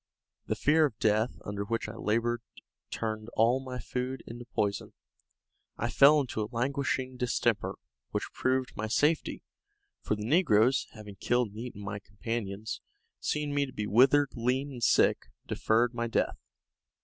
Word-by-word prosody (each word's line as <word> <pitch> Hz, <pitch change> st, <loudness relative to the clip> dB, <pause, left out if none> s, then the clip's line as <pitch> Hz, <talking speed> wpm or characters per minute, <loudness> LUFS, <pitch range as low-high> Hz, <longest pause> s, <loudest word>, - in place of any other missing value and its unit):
The -, -, 0 dB
fear 155 Hz, +2 st, +4 dB
of 125 Hz, -8 st, -3 dB
death 110 Hz, +3 st, +1 dB
under 100 Hz, 0 st, -3 dB
which 115 Hz, +2 st, -2 dB
I 105 Hz, -, -6 dB
labored 115 Hz, +2 st, 0 dB, 0.5 s
turned 110 Hz, 0 st, -3 dB
all 120 Hz, +4 st, +4 dB
my 130 Hz, -1 st, -6 dB
food 125 Hz, +1 st, -4 dB
into 120 Hz, +1 st, -8 dB
poison. 100 Hz, -4 st, -2 dB, 0.8 s
I -, -, -1 dB
fell 150 Hz, +2 st, +7 dB
into 125 Hz, -5 st, -2 dB
a 105 Hz, -, -3 dB
languishing 130 Hz, +1 st, -1 dB
distemper, 115 Hz, -6 st, 0 dB, 0.3 s
which -, -, -3 dB
proved 130 Hz, -1 st, 0 dB
my 110 Hz, -, -3 dB
safety; 150 Hz, +8 st, +1 dB, 0.6 s
for -, -, 0 dB
the 105 Hz, 0 st, -5 dB
negroes, 130 Hz, -, +3 dB
having 105 Hz, -2 st, -10 dB
killed 120 Hz, +1 st, +1 dB
and 105 Hz, +2 st, -10 dB
eaten 115 Hz, -4 st, -7 dB
my 100 Hz, +1 st, -4 dB
companions, 105 Hz, 0 st, -5 dB, 0.4 s
seeing 150 Hz, -, -1 dB
me 145 Hz, -1 st, +1 dB
to 130 Hz, -, -11 dB
be 105 Hz, -, -3 dB
withered, 135 Hz, +6 st, +5 dB
lean 130 Hz, +4 st, 0 dB
and 125 Hz, -3 st, -8 dB
sick, -, -, +3 dB, 0.2 s
deferred 115 Hz, +2 st, +1 dB
my 120 Hz, 0 st, -2 dB
death. 115 Hz, -, 0 dB
120 Hz, 155 wpm, -30 LUFS, 110-130 Hz, 0.8 s, fell